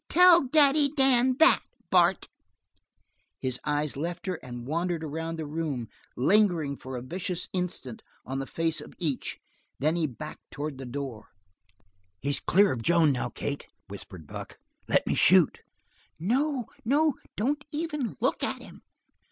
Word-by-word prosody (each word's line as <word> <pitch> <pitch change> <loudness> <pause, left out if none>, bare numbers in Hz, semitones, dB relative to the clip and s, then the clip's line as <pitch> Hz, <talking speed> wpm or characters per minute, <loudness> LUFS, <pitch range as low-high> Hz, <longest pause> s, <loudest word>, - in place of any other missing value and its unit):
Tell 355 0 +7
Daddy 285 +1 +5
Dan 260 -3 +3
that, 320 +3 +6 0.3
Bart." - - +4 1.1
His 130 -2 -1
eyes 150 0 -1
left 170 +5 -4
her 185 -3 -2
and 120 -1 -8
wandered 165 +3 -1
around 165 +2 -4
the 160 - -4
room, 145 -6 -3 0.3
lingering 170 - +3
for 130 -1 -7
a 120 - -6
vicious 180 +5 -2
instant 180 -10 -3 0.2
on 135 +1 -3
the 135 - -4
face 165 -1 -1
of - - -12
each, 150 -7 -2 0.4
then 155 +4 +1
he 165 -2 +1
backed 150 +4 -9
toward 145 -2 -5
the 135 - -7
door. 125 -4 -6 0.9
"He's 140 +5 0
clear 200 +2 +4
of 120 - -3
Joan 165 +2 +4
now, 130 - -2
Kate," 140 0 -5 0.2
whispered 95 -4 -9
Buck. - - -8 0.3
"Let - - +2
me - - 0
shoot!" - - +5 0.6
"No, 255 - 0 0.2
no! 290 +5 +3 0.2
Don't 285 +7 -1
even 300 -6 -3
look 255 +4 0
at - - -1
him." - - -13
165 Hz, 150 wpm, -28 LUFS, -, 1.1 s, Tell